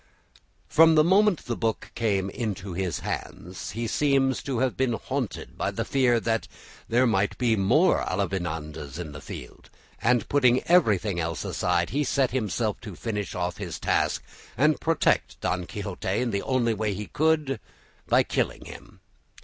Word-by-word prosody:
From 165 0 +6
the 155 - +6
moment 195 +1 +3
the 120 - -2
book 110 -1 -2
came 100 -4 0
into 100 -5 -4
his 90 -1 -2
hands 90 +2 -5
he 115 - -1
seems 135 +1 +2
to 135 -3 -3
have 130 +1 +1
been 130 -2 +1
haunted 130 0 -4
by - - 0
the - - -3
fear 125 -3 +3
that 115 0 -1 0.4
there 120 +3 +4
might 105 -4 +1
be 120 -3 +2
more 110 - +3
Avellanedas 80 -6 -3
in 85 -4 -6
the 75 0 -9
field, - - -10 0.3
and 120 0 +2
putting 130 -3 +3
everything 105 - +3
else 85 -1 -3
aside, 90 -1 0
he 145 +3 +1
set 135 -2 +1
himself 110 -3 -1
to 105 -5 -8
finish 105 -1 -4
off 90 -1 -2
his - - -5
task - - 0 0.3
and 150 +3 +3
protect 165 -1 +1
Don 90 +2 -2
Quixote 100 -1 -6
in 115 +5 0
the 100 -1 -1
only 120 -3 +1
way 105 -1 -1
he 105 +2 -5
could, 150 -1 +1 0.5
by - - +4
killing - - -2
him. - - -12
115 Hz, 165 wpm, -26 LUFS, 95-130 Hz, 0.5 s, From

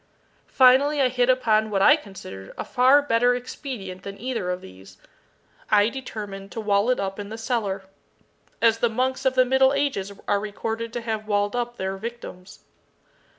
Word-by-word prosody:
Finally 275 +3 +4
I 260 -2 +4
hit 250 0 +1
upon 220 -4 +2
what 195 -2 +1
I 295 - +8
considered 190 - -10
a - - -4
far 260 +4 +4
better 245 -2 +2
expedient 240 -7 -7
than 200 +1 -9
either 230 -6 -3
of 180 0 -3
these. 95 +1 -14 0.7
I 210 0 +4
determined 205 -6 -7
to - - -5
wall 205 +1 +1
it 255 - +2
up 195 +1 -3
in 205 0 -6
the 220 - -7
cellar 225 -5 -2 0.8
as 225 -1 +4
the 235 - +2
monks 255 +4 -1
of 260 0 +2
the 255 0 +5
middle 265 +1 +4
ages 275 -9 -1 0.2
are 205 - +2
recorded 225 +2 -4
to 240 - -3
have 220 -2 -4
walled 205 +1 0
up 240 0 -3
their 190 0 -3
victims. 210 -4 -9
225 Hz, 175 wpm, -24 LUFS, 200-255 Hz, 0.8 s, I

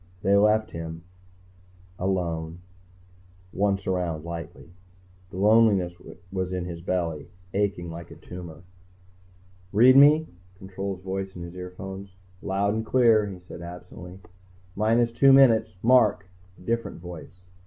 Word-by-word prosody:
_ - - -30
They 100 +1 +3
left 105 +2 +3
him. 80 0 -7 1.0
Alone. 85 -3 -2 0.9
Once 100 0 0
around 85 -4 -2
lightly. 85 0 -8 0.6
The 95 - -9
loneliness 100 -4 +3 0.4
was 95 -1 -3
in 90 -1 -3
his 85 -1 -7
belly, 85 -4 -3 0.2
aching 95 -4 -1
like 85 0 -9
a - - -11
tumor. 85 -2 -10 0.6
"... 90 0 -30
read 130 +2 +8
me?" 150 +3 +7 0.3
Control's 95 -1 -6
voice 95 0 -4
in 90 - -7
his 85 0 -9
earphones. 95 +1 -8 0.3
"Loud 100 +1 0
and 110 +1 -2
clear," 115 -3 +3
he 95 -2 -7
said 90 -1 -11
absently. 90 +1 -10 0.3
"... 90 0 -29
minus 115 +3 +2
two 135 +4 +5
minutes... 130 -8 +5
mark!" 115 -5 +4 0.3
A - - -18
different 115 +2 -3
voice. 90 0 -11
95 Hz, 135 wpm, -25 LUFS, 90-105 Hz, 1.0 s, read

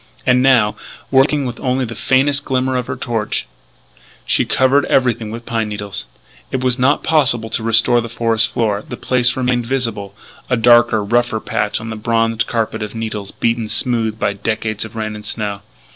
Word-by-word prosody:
And 125 0 +4
now, 125 -5 +3 0.3
working 140 +1 +3
with 120 -2 -5
only 130 0 0
the 115 - -6
faintest 140 +5 +1
glimmer 130 -1 0
of 125 -1 -2
her - - -3
torch, 115 -3 -2 0.8
she - - +3
covered 135 +2 +3
everything 120 -4 +1
with 115 +2 -7
pine 115 -2 -2
needles. 105 -1 -6 0.4
It 130 -1 -3
was 125 0 +1
not 135 +3 +2
possible 125 -8 +1
to 115 - 0
restore 115 +2 +3
the 115 - -6
forest 115 -1 +1
floor; 110 -3 -1
the - - -6
place 125 -1 +1
remained 125 -2 0
visible 115 -7 -2 0.3
a 125 - +2
darker, 115 -2 +5
rougher 120 +1 +1
patch 105 -1 -2
on 115 +1 -6
the - - -4
bronzed 115 +1 0
carpet 115 -1 -2
of 105 +1 -5
needles 110 -3 -4
beaten 115 0 -1
smooth 115 -1 0
by 100 -2 0
decades 110 +1 -2
of 110 - -11
rain 110 -1 -3
and 105 0 -9
snow. 105 -2 -3
115 Hz, 180 wpm, -17 LUFS, 110-125 Hz, 0.8 s, darker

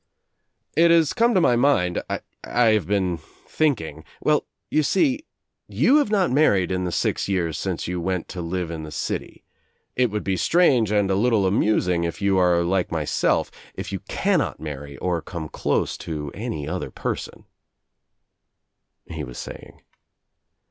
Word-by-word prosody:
"It 170 +3 +5
has 165 -2 +4
come 235 +1 +3
into 195 -6 +3
my 125 - +4
mind 120 -9 +2
— - - -45
I - - -2 0.5
have 105 -7 +2
been 95 -4 0
thinking 80 - -2
— - - -27
well 150 -1 +2 0.2
you 155 - +3
sec 260 - +2 0.5
you 280 - +4
have 290 -8 +2
not 195 -7 +2
married 100 - +3
in 90 0 -1
the 90 - -2
six - - 0
ycara 90 -5 0
since 90 +1 -3
you 90 0 -2
went 90 0 -2
to 90 - -5
live 85 0 -3
in 80 -1 -5
the 80 - -7
city. - - -5 0.5
It 125 -1 +2
would 105 0 -3
be 95 -1 -1
strange 130 - +3
and 100 -2 +2
a - - +2
little 110 -1 +2
amusing 95 -3 +2
if 85 -1 -3
you 100 -1 +2
are 90 -1 +3
like 90 +1 0
myself, 80 -3 0 0.2
if - - -6
you 95 - -3
can 195 -2 +2
not - - -2
marry 70 -2 -7
or 85 +1 -1
come 80 -2 -6
close - - -1
to 75 -3 -5
any 75 -2 -4
other - - -3
person," - - -5 1.6
he - - -6
was 60 -1 -8
saying. - - -9
95 Hz, 170 wpm, -23 LUFS, 85-130 Hz, 1.6 s, It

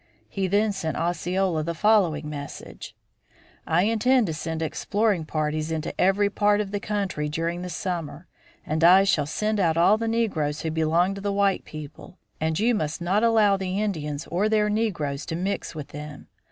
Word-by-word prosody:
He 195 -1 -2
then 205 +3 +2
sent 170 -5 -3
Osceola 175 0 0
the 170 +2 -3
following 175 -6 +2
message: 145 -1 -8 0.7
"I 170 +3 +3
intend 230 +3 +3
to 165 - -3
send 160 +1 -4
exploring 200 +2 0
parties 155 0 -2
into 160 -1 -3
every 195 +2 +3
part 205 0 +2
of 205 -2 -3
the 205 - -2
country 200 -8 -2
during 165 +3 -2
the 180 - -5
summer, 170 -2 -4 0.4
and 155 +1 -1
I 185 +3 +8
shall 155 -7 +1
send 210 +7 -1
out 165 -4 +2
all 195 +6 +4
the 230 - -2
negroes 175 -11 -1
who 160 - -2
belong 165 +4 +2
to 195 - -7
the 200 0 -1
white 200 -1 +1
people, 155 +4 -10 0.2
and 160 +1 -1
you 235 +3 +3
must 155 -7 -2
not 190 +5 +1
allow 215 -4 +4
the 190 0 -2
Indians 155 -8 -3
or 195 +5 +1
their 210 -1 +2
negroes 170 -10 -1
to 160 - -3
mix 185 -1 -3
with 150 -3 -7
them. 150 0 -9
180 Hz, 180 wpm, -25 LUFS, 155-205 Hz, 0.7 s, I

